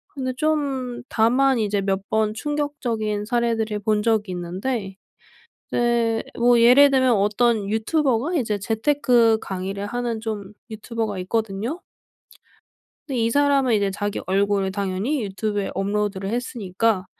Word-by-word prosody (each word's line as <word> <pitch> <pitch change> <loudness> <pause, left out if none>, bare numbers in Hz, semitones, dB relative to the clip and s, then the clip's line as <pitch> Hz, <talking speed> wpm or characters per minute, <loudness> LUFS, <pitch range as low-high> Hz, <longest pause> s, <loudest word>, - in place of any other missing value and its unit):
근데 255 -2 -3
좀 275 -5 -1
다만 255 +4 +3
이제 205 -1 0
몇 195 0 -2
번 215 -1 +1
충격적인 235 -7 -2
사례들을 225 -2 0
본 210 0 0
적이 220 -3 +1
있는데 190 +3 -4 0.7
이제 235 -2 +1 0.2
뭐 240 0 +5
예를 260 +4 +7
들면 260 -2 +3
어떤 210 +1 +1
유튜버가 260 - 0
이제 220 -7 0
재테크 230 +1 +2
강의를 195 +1 -4
하는 240 -1 -3
좀 210 -3 -5 0.2
유튜버가 220 -2 -4
있거든요. 220 - -2 1.3
근데 270 -5 -3
이 230 0 +1
사람은 280 -2 +3
이제 200 -2 +1
자기 205 +1 -3
얼굴을 195 0 +1
당연히 200 +7 -2
유튜브에 205 0 -2
업로드를 200 0 -2
했으니까 225 -4 -1
220 Hz, 290 characters per minute, -23 LUFS, 200-245 Hz, 1.3 s, 예를